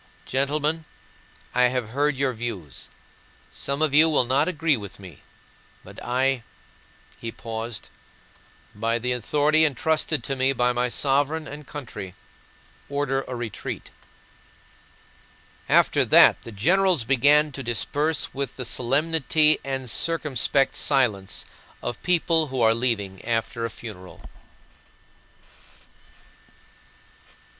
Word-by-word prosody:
"Gentlemen, 150 +4 0 0.7
I 125 - +4
have 125 -3 -1
heard 145 +4 0
your 135 -1 0
views. 110 - -7 0.6
Some 140 +2 -2
of 155 -3 +1
you 155 +2 +7
will 150 - +4
not 130 +6 +2
agree 165 -3 +1
with 100 -5 -9
me. 90 -7 -12 0.6
But - - -12
I," 130 +1 +1 0.8
he 115 - -5
paused, 115 0 -6 0.8
"by 115 +2 -1
the 125 +2 -2
authority 150 +6 +2
entrusted 155 -1 +1
to 135 - -2
me 130 +1 +2
by 125 -1 +1
my 125 +1 0
Sovereign 145 +4 +1
and 145 0 -9
country, 105 -10 -8 0.7
order 140 -1 -1
a 125 - -5
retreat." 120 -3 -6 1.8
After - - +4
that - - +6
the 115 - -10
generals 175 - +2
began 145 +5 +4
to 135 - -7
disperse 145 +6 -1
with 140 0 -4
the 125 - -5
solemnity 150 +5 +2
and 135 -1 -4
circumspect 135 -1 +1
silence 115 -9 0 0.4
of 120 - -4
people 165 -2 +2
who 130 -1 -4
are 110 0 +5
leaving, 105 -6 -2
after 115 0 -2
a - - -10
funeral. 105 -5 -11
135 Hz, 115 wpm, -24 LUFS, 115-150 Hz, 1.8 s, you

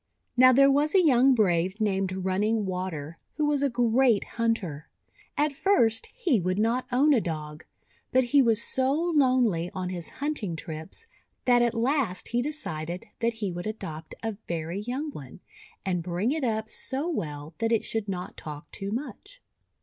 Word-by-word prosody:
Now, 255 +1 +7
there 275 +2 +6
was 295 +5 +2
a 370 -3 +6
young 260 -2 +5
brave 190 -2 +1
named 190 -3 -1
Run 190 +1 0
ning 215 0 +1
Water, 180 -4 -4 0.2
who 300 - +1
was 295 -1 +1
a 280 - +2
great 240 -2 +3
hunter. 215 -11 -2 0.5
At 295 0 +2
first 235 - +2
he 355 - +2
would 185 +2 -1
not 230 +4 +1
own 285 +4 +4
a 240 - +3
Dog. 155 -3 -5 0.5
But 260 - +4
he 275 +3 +4
was 230 -3 +3
so 260 +1 +1
lonely 255 - +2
on 185 -1 -3
his 175 -2 -5
hunting 275 - -3
trips, 160 - -8 0.4
that 245 -1 +5
at 240 -1 +1
last 235 -5 0
he 240 +1 +1
decided 175 - -4
that 230 0 +1
he 210 -4 -3
would 175 +3 -5
adopt 160 -7 -6
a 225 -3 -3
very 170 +2 -3
young 260 +8 -3
one, 135 - -10 0.5
and 180 -2 0
bring 180 +7 -1
it 310 -1 -1
up 220 -2 0
so 270 +7 -1
well 150 - -4
that 225 0 0
it 225 - +2
should 220 -2 -3
not 180 -2 -5
talk 150 -1 -9
too 195 - -5
much. 295 - -6
225 Hz, 175 wpm, -27 LUFS, 180-265 Hz, 0.5 s, Now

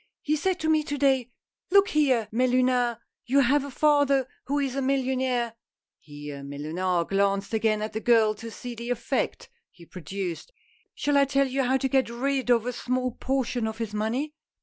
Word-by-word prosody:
" - - -63
He 300 - +1
said 365 +4 -1
to 315 - -1
me 315 -1 +4
to 290 -1 -4
day, 265 -3 +2 0.2
' - - -65
Look 400 +1 +5
here, 260 -7 +2
Mellunard, 250 0 +2 0.3
you 275 +3 +4
have 275 +2 +3
a 280 - -6
father 280 -2 +3 0.2
who 285 +2 -1
is 275 -3 -1
a 275 - -1
millionaire,' 260 -3 0 0.3
— - - -67
here 145 -1 -8
Mellunard 165 +5 -2
glanced 200 +1 0
again 215 -1 +1
at 215 - -5
the 220 - -2
girl 225 -2 +4
to 230 +2 -9
see 245 +2 -7
the 235 +1 -7
effect 245 +2 -2 0.2
he 170 - -17
produced 185 - -6 0.2
— - - -34
' - - -51
shall 290 -1 +1
I 280 - +5
tell 275 0 +2
you 265 +1 -1
how 260 +1 +2
to 265 - -1
get 265 -2 +1
rid 260 +2 -1
of 235 -2 +4
a 250 - -2
small 255 +1 -1
portion 255 -2 -1
of 220 0 -5
his 225 -2 -4
money 235 +8 -2
250 Hz, 205 wpm, -26 LUFS, 220-275 Hz, 0.3 s, Look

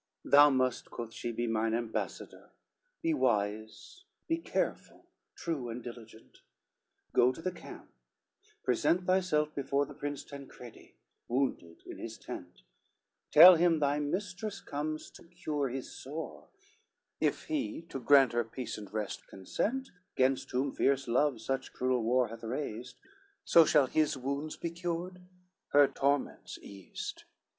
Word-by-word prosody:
XCIX - - -11
"Thou 145 +1 +9
must," 130 -2 +1
quoth 115 -1 -7
she, 120 - -4
"be 120 +1 -2
mine 115 0 0
ambassador, 115 -1 -4 0.5
Be 330 -1 +2
wise, 110 - -1 0.2
be 330 0 0
careful, - - -3 0.3
true, 145 -8 -3
and 115 +1 -6
diligent, 115 -2 -11 0.7
Go 125 - +5
to 130 - -10
the 185 +3 -2
camp, - - -12 0.7
present 180 +1 +2
thyself 180 -5 +2
before 140 0 0
The - - -11
Prince 145 -1 -5
Tancredi, 135 -4 -12 0.3
wounded 120 -10 -2
in - - -9
his 110 -1 -7
tent; 90 -6 -9 0.7
Tell 175 +3 +10
him 170 -1 +4
thy 145 0 +1
mistress 185 +7 -3
comes 155 +2 -4
to - - -14
cure 155 -5 -3
his 130 +1 -5
sore, 155 +4 -7 0.7
If - - 0
he 300 - -3
to 135 - -5
grant 135 0 +5
her 120 0 +2
peace 115 0 -6
and 100 -2 -10
rest 105 -2 -4
consent 250 - -3 0.3
Gainst 130 0 +2
whom 130 +2 0
fierce 135 0 +1
love 130 +1 +2
such 130 +3 -3
cruel 125 -1 +1
war 120 +1 +2
hath 115 - -9
raised, 120 0 -5 0.5
So 165 -1 +7
shall 150 -2 +5
his 150 +1 +1
wounds 140 +4 -3
be 170 - -4
cured, 175 +1 -4 0.5
her 145 0 +7
torments 140 +1 -1
eased. 95 -2 -8
135 Hz, 140 wpm, -31 LUFS, 120-155 Hz, 0.7 s, Tell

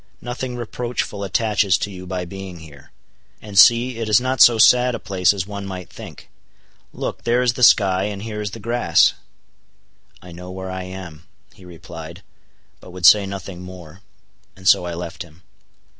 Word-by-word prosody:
Nothing 125 +1 -5
reproachful 120 -3 -4
attaches 100 -1 +1
to 105 - -4
you 90 -1 -10
by 90 -1 -4
being 95 -1 -9
here. 70 -3 -15 0.5
And 105 -2 -11
see, 120 +4 +5
it 115 -1 -3
is 105 - +5
not 130 0 -1
so 120 -2 +7
sad 125 +2 +5
a - - -6
place 95 -4 +1
as 100 -3 -3
one 100 -1 -7
might 90 -2 -8
think. - - -12 0.6
Look, - - -6
there 120 +2 +1
is 120 -1 +1
the 125 - -7
sky, 95 -5 +4
and 100 -1 -5
here 105 -1 -5
is 105 - -3
the 115 - -10
grass." 120 +3 +2 1.1
"I 90 - -14
know 90 +2 -10
where 95 0 -7
I 95 0 -5
am," 90 -4 -10 0.3
he 95 - -17
replied, 85 +1 -11 0.6
but - - -14
would 90 -1 -4
say 100 +2 +7
nothing 95 -2 -8
more, 90 -1 -12 0.5
and 95 0 -8
so 90 - +4
I 85 - -5
left 85 -1 -7
him. 85 +1 -12
95 Hz, 180 wpm, -20 LUFS, 90-110 Hz, 1.1 s, so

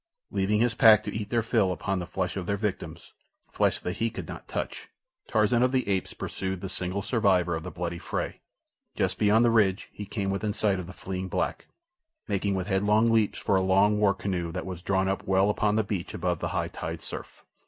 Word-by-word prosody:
Leaving 100 +1 +1
his 120 0 +3
pack 110 -1 +7
to - - -5
eat 105 -1 -3
their 115 0 +1
fill 110 -5 +2
upon 95 +1 -2
the 90 - -5
flesh 90 - -2
of 95 -3 -4
their 100 - 0
victims—flesh 105 -2 -3
that 90 - -4
he 115 +1 +1
could - - -7
not - - -8
touch—Tarzan 110 +3 -2
of 125 0 +3
the 130 -4 0
Apes 95 -2 -1
pursued 95 -1 -4
the 95 - -5
single 95 +2 -3
survivor 95 -8 +2
of 80 - -4
the - - -6
bloody 85 0 -4
fray. - - -4 0.5
Just - - 0
beyond 110 +3 +4
the 120 - +4
ridge 105 -3 +2
he 105 - -7
came 100 -2 -2
within 105 +2 -1
sight 100 -3 +1
of 90 - -6
the 90 - -9
fleeing 95 0 -5
black, - - -2 0.6
making 100 0 0
with 95 -1 -2
headlong 105 +3 +3
leaps 110 -2 +2
for 100 - +1
a 95 - +3
long 100 +3 +3
war 100 -2 +3
canoe 90 -4 -2
that 90 +2 -4
was 90 -2 -6
drawn 95 +1 +1 0.2
well 95 +2 +4
up - - -6
upon 105 0 +2
the 110 - +2
beach 100 -3 -4
above - - -1
the - - -2
high - - -2
tide - - -5
surf. - - -8
100 Hz, 215 wpm, -27 LUFS, 95-105 Hz, 0.6 s, pack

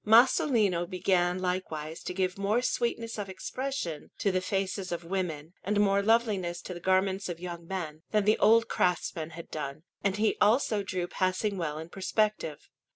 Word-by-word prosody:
Masolino 220 - +4
began 180 -1 +2
likewise 175 -4 -3
to - - -4
give 185 -1 0
more 205 +5 +1
sweetness 235 -2 -1
of 200 -2 -4
expression 190 - -4
to 200 - +1
the 185 0 +1
faces 190 0 -2
of 170 0 -3
women, 170 -3 -3
and 205 +1 +1
more 200 -1 +4
loveliness 200 -6 +2
to 180 - -5
the 175 - -7
garments 190 +1 +1
of 170 -1 -4
young 170 -1 -7
men, 160 -5 -4
than 210 -2 +2
the 215 +1 +4
old 225 +1 +5
craftsmen 175 -2 0
had 170 0 -10
done; 150 0 -5 0.2
and 200 -1 +1
he 215 0 +2
also 215 -1 +4
drew 185 -2 -2
passing 185 +3 0
well 160 -5 -2
in 160 +1 -6
perspective. 195 -4 -1
185 Hz, 170 wpm, -29 LUFS, 175-210 Hz, 0.2 s, old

